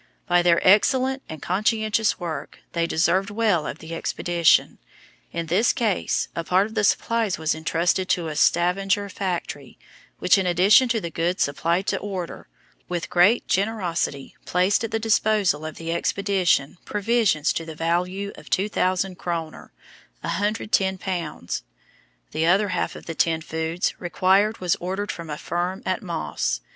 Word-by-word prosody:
By 175 0 +3
their 175 -1 +4
excellent 260 +7 +4
and 160 -3 -8
conscientious 215 +3 +1
work 160 -5 -5
they 170 -1 0
deserved 185 +5 +1
well 205 -7 +1
of - - -5
the 160 +1 -9
expedition. 170 0 +2 0.5
In 170 0 -3
this 185 +9 +3
case 220 -6 0
a 170 - -2
part 185 +3 +3
of 220 - -9
the 215 -2 0
supplies 225 -1 +1
was 160 -1 0
entrusted 170 +4 0
to 170 -2 +1
a 155 - -5
Stavanger 195 +5 +2
factory, 175 -8 -4 0.4
which, 185 - +4
in 190 - 0
addition 195 +8 +5
to 230 -1 +1
the 170 - -5
goods 175 +3 0
supplied 170 +6 0
to - - -1
order, 190 -4 -6 0.4
with 175 -2 -3
great 180 +7 +4
generosity 185 -9 -1
placed 185 +5 +1
at 225 - -2
the 225 - -1
disposal 215 -7 +2
of 155 - -6
the 165 0 -4
expedition 180 -4 0
provisions 210 -7 +1
to 165 - -3
the 160 -1 -8
value 180 +5 -1
of - - -14
2,000 185 -2 0
kroner 165 -3 -5 0.5
(£110). 190 - -1 0.7
The 160 +1 0
other 200 +4 +3
half 180 -2 -2
of - - -11
the 165 - -5
tinned 160 0 +1
foods 160 +3 -2
required 190 +5 +2
was 180 -2 0
ordered 190 +3 -3
from 170 -2 -8
a 150 - -4
firm 175 +3 -3
at 185 -1 -1
Moss. 165 - -2
180 Hz, 150 wpm, -24 LUFS, 165-205 Hz, 0.7 s, addition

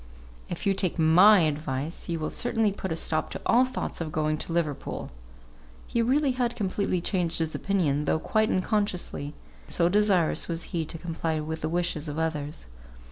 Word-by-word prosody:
If 175 - -5
you 200 - +3
take 185 -2 0
my 180 +5 +7
advice, 150 +1 -2
you 170 - -1
will 155 - -3
certainly 225 -3 +1
put 190 -2 -5
a - - 0
stop 160 -1 +1
to - - -6
all 245 +2 +5
thoughts 255 - -4
of 160 -2 -3
going 155 0 0
to - - -5
Liverpool." 160 - -2 0.7
He 235 - 0
really 270 +4 +2
had 245 -1 -1
completely 195 -3 -1
changed 175 -2 0
his 160 -1 -1
opinion, 155 -7 0
though - - +2
quite 215 +6 +1
unconsciously; 185 -7 -1 0.3
so 170 -1 +2
desirous 195 -4 +2
was 165 -1 -2
he 165 -2 0
to 165 - -6
comply 165 -1 -2
with 160 +1 -4
the 155 - -1
wishes 170 -2 -1
of 145 0 -5
others. 150 - -3
170 Hz, 180 wpm, -27 LUFS, 155-200 Hz, 0.7 s, my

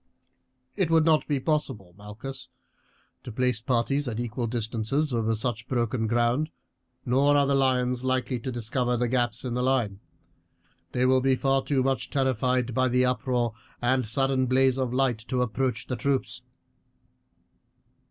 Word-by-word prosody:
"It 190 -5 0
would 160 -1 +4
not 155 -2 +3
be 145 -3 0
possible, 130 - -2
Malchus, 120 +6 -8 0.7
to 125 - -8
place 125 0 0
the 115 - -37
parties 135 +3 +1
at 115 -2 -3
equal 120 0 -3
distances 120 +5 -1
over 115 -1 +1
such 110 0 -3
broken 120 -2 -1
ground. 120 +6 +1 0.6
Nor 140 +4 +3
are 140 - +4
the 140 - +1
lions 125 -2 +1
likely 130 -1 0
to 130 +3 -4
discover 120 +1 -1
the 120 +1 0
gaps 120 0 -1
in 125 - -2
the 125 - -1
line; 125 -7 0 0.9
they 125 0 +2
will 130 0 +4
be 135 0 +3
far 135 +1 +1
too 135 -3 +1
much 135 0 -1
terrified 130 -2 0
by 130 +2 +2
the 125 +1 +2
uproar 125 -2 0 0.3
and 125 -1 +1
sudden 135 +2 +1
blaze 130 +1 +3
of 130 -2 -1
light 125 -3 +1
to 125 -1 +1
approach 125 +2 -2
the 125 - -3
troops. 140 0 -1
125 Hz, 160 wpm, -26 LUFS, 120-135 Hz, 0.9 s, would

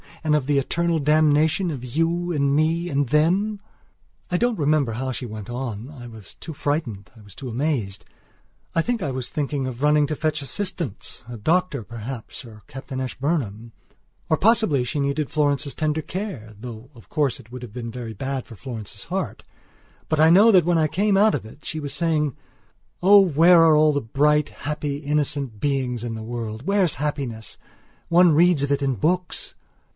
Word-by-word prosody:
And 155 -1 +2
of 150 -4 0
the 145 0 +1
eternal 170 +4 0
damnation 155 +4 +3
of 135 -5 -6
you 165 +7 -1
and 140 -3 +1
me 165 +3 +1
and 140 -3 0
them... 185 +8 +2 0.3
." - - -36
I 180 - +2
don't 240 +2 +1
remember 145 -5 +1
how 130 +3 -3
she 125 - -4
went 110 -1 -8
on; 120 -1 -5
I 135 -5 -10
was 110 -4 -12
too 160 - -8
frightened; 140 - -3
I - - -14
was 100 -2 -15
too 130 +3 -7
amazed. 115 - -2 0.7
I 165 - +4
think 240 +1 -1
I 140 - -1
was 130 -1 -4
thinking 145 -2 -2
of 130 -1 -6
running 150 0 +4
to 155 - -2
fetch 155 0 -1
assistancea 135 - -5
doctor, 170 -5 +1
perhaps, 115 +3 -8
or 110 -2 -13
Captain 135 0 -7
Ashburnham. 125 -5 -3 0.6
Or 155 - +3
possibly 215 - +3
she 145 +5 -3
needed 140 +1 -1
Florence's 145 -2 0
tender 155 0 0
care, 155 - -6
though, 120 +1 -9
of 115 - -17
course, 145 -5 0
it 115 - -16
would 125 0 -8
have 115 -4 -9
been 115 -1 -5
very 120 -2 -6
bad 135 +4 -4
for 115 - -12
Florence's 115 -3 -8
heart. - - -4 0.6
But 155 - 0
I 160 +1 +7
know 205 +6 +7
that 180 -5 +5
when 175 -1 +2
I 155 - +3
came 200 +5 +1
out 215 +2 +5
of 130 - -5
it 110 - -14
she 155 - -4
was 145 -2 -5
saying: 150 -3 0 0.7
"Oh, 200 +2 +8
where 170 -1 +6
are 160 -1 +6
all 155 0 +4
the 145 - 0
bright, 150 +5 +2
happy, 145 -1 -4
innocent 145 -5 -1
beings 130 -4 -1
in 120 -1 -3
the 110 - -6
world? 115 0 -5
Where's 195 -3 +2
happiness? 135 -7 -4 0.5
One 175 -1 +5
reads 170 -1 +4
of 140 - -1
it 140 0 +1
in 135 -2 +1
books!" 180 - -1
145 Hz, 190 wpm, -23 LUFS, 125-160 Hz, 0.7 s, Oh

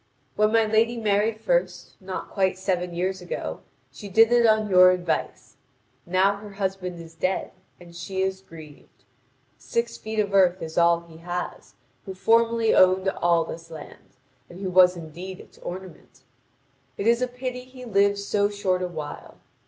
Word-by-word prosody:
When 215 0 +3
my 225 0 +4
lady 225 +2 +2
married 215 0 +1
first, - - -1
not 185 0 -6
quite 190 -2 0
seven 180 -2 -2
years 185 +2 -2
ago, 175 - -5 0.3
she 205 - -10
did 225 +4 +5
it 240 -1 +5
on 215 -1 +3
your 185 -2 +7
advice. 180 -2 -2 0.5
Now 190 +3 +2
her 205 0 -11
husband 190 -3 -4
is 165 -1 -11
dead, 185 +3 -2 0.3
and 170 -1 -15
she 190 +3 -3
is 190 0 -2
grieved. 160 -5 -15 0.6
Six 235 0 -2
feet 220 0 -6
of 205 -2 0
earth 185 -2 +4
is 160 0 -7
all 170 0 +4
he 165 -1 -15
has, 175 +2 -6 0.3
who 190 - -6
formerly 230 +3 +3
owned 185 +1 +4
all 170 -3 +2
this 165 0 -9
land, 160 -2 -12 0.3
and 175 - -11
who 190 -2 -3
was 180 0 +5
indeed 175 +3 -8
its - - -16
ornament. 180 -6 -9 0.8
It 200 - -3
is 235 +2 +3
a 250 - +1
pity 250 0 -5
he 255 0 -12
lived 200 -2 +2
so 200 0 0
short 190 -3 -1
a 180 - -1
while. 155 -4 -8
190 Hz, 170 wpm, -24 LUFS, 175-215 Hz, 0.8 s, your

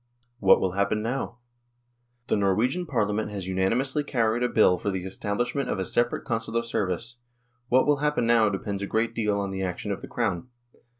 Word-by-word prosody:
What - - +6
will 95 - 0
happen 100 +3 0
now? 120 0 -3 0.9
The - - +1
Norwegian 110 - +1
Parlia 105 -7 0
ment 105 0 -1
has 100 -3 -5
unanimously 115 +10 0
carried 120 -4 0
a 125 - +2
Bill 90 -6 +4
for - - -2
the 95 -2 -2
establish 100 +5 -2
ment 140 -3 -2
of - - -1
a 95 - -2
separate 120 +4 0
Consular 115 0 -1
service; 115 +1 -2 0.5
what 130 +1 +4
will 145 -1 +3
happen 150 -3 +1
now 115 -2 +4
depends 100 0 -3
a 100 - -2
greal 115 +2 0
deal 105 -3 0
on 100 -1 -2
the 95 0 -4
action 90 -2 -3
of - - -3
the - - -8
Crown. 85 +6 -2
110 Hz, 195 wpm, -26 LUFS, 100-120 Hz, 0.9 s, What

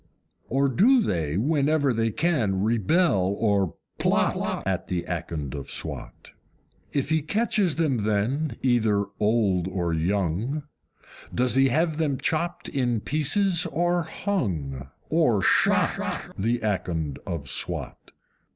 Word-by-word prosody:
Or 135 +2 +2
do 225 - +4
they, 80 - -1
whenever 145 +2 +2
they 115 0 +1
can, 110 - 0
rebel, 110 - +2
or 100 -6 +1 0.2
PLOT, - - +1
At - - -1
the 90 -2 -2
Akond 80 -5 -4
of 70 -2 -6
Swat? - - -6 0.6
If 140 +2 -1
he 160 0 +3
catches 205 0 +1
them 150 -7 +1
then, 110 +9 0
either 110 -5 +2
old 105 -5 +2
or 90 -3 -1
young, 100 - -1 0.7
Does 125 0 +1
he 135 +1 +4
have 155 +4 +1
them 150 -4 0
chopped 170 +5 -1
in 120 -5 0
pieces 170 - +1
or 175 +1 +1
hung, 85 - -3 0.2
or - - +3
shot, - - +2 0.2
The 115 +4 0
Akond 85 -8 -2
of 85 -6 -4
Swat? 65 - -3
120 Hz, 125 wpm, -25 LUFS, 95-155 Hz, 0.7 s, do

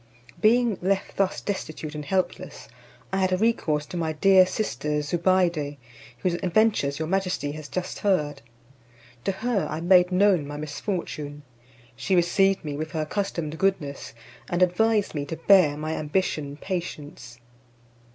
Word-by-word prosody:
Being 230 -1 +3
left 195 +2 -1
thus 195 -1 0
destitute 155 -6 -5
and 150 -1 -5
helpless, 185 +5 -3 0.5
I - - +1
had 185 -1 +1
recourse 160 -10 +1
to 175 - -7
my 160 -2 -1
dear 185 +3 +5
sister 150 - -2
Zobeide, 170 -3 +1 0.4
whose 180 +7 -1
adventures 185 -7 +2
your 160 - -3
majesty 180 -5 -1
has 155 0 -8
just 180 -1 -4
heard. 165 -8 0 0.8
To - - +2
her 220 +1 -1
I 155 - -3
made 180 +1 +5
known 185 -5 +3
my 145 0 -6
misfortune; 150 -2 -5 0.5
she 190 +9 0
received 190 +1 +2
me 145 -1 -3
with 155 +3 -5
her 160 - -1
accustomed 160 -2 -3
goodness, 155 -11 -1 0.3
and 175 +1 +2
advised 210 +4 +2
me 145 -2 -2
to 165 - -5
bear 165 -4 +5
my 155 +1 -3
ambition 150 -3 -2
patience. 150 -9 -6
175 Hz, 140 wpm, -25 LUFS, 150-195 Hz, 0.8 s, dear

